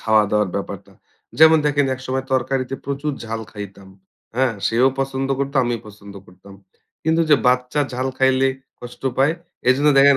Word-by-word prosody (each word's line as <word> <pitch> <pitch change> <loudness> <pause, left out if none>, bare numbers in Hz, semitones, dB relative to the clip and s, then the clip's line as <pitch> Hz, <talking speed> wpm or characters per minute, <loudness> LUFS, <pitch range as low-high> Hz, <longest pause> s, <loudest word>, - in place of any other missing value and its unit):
খাওয়া 110 -1 +3
দাওয়ার 105 -2 +2
ব্যাপারটা। 100 - -6 0.5
যেমন 160 0 +8
দেখেন 145 -1 +2
একসময় 130 +1 -4
তরকারিতে 130 0 0
প্রচুর 140 +1 -2
ঝাল 115 0 -4
খাইতাম। 100 -2 -9 0.5
হ্যাঁ? 130 -3 +2
সেও 120 +3 +3
পছন্দ 135 0 -2
করত 140 0 -2
আমিও 120 -2 -2
পছন্দ 100 -1 -13
করতাম। 95 +2 -16 0.5
কিন্তু 160 +1 +2
যে 145 - +8
বাচ্চা 125 +3 +1
ঝাল 130 +1 -2
খাইলে 130 0 +3 0.3
কষ্ট 120 0 -11 0.2
পায়। 140 +4 +4 0.4
এজন্য 140 +4 +4
দেখেন 140 0 +7
130 Hz, 155 wpm, -21 LUFS, 110-135 Hz, 0.5 s, যেমন